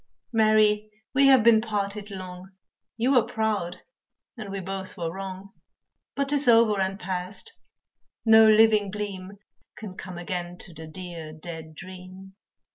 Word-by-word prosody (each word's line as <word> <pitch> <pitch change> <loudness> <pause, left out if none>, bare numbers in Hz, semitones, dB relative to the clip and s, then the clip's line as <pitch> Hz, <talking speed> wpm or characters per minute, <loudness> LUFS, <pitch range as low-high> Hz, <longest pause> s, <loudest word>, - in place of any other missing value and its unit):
Mary, 215 -1 +3 0.2
we 275 +1 +5
have 265 -4 +6
been 225 -1 +6
parted 205 -1 -3
long, 185 -1 -8 0.5
You 240 +4 +1
were 255 -3 +6
proud, 215 -6 -2 0.5
and 215 -5 -8
we 195 0 -4
both 190 0 -6
were 165 -1 -3
wrong, 195 0 -7 0.6
But 280 -1 -1
'tis 290 -2 +1
over 225 -4 +5
and 190 +1 -2
past, 190 - -4 0.7
no 220 0 +8
living 215 -2 +5
gleam 200 -1 -6 0.4
Can 210 -4 -8
come 185 -2 -8
again 175 0 -5
to 175 - -8
the 160 0 -9
dear, 165 -1 -8
dead 160 -1 -9
dream. 185 +2 -11
195 Hz, 140 wpm, -26 LUFS, 185-220 Hz, 0.7 s, no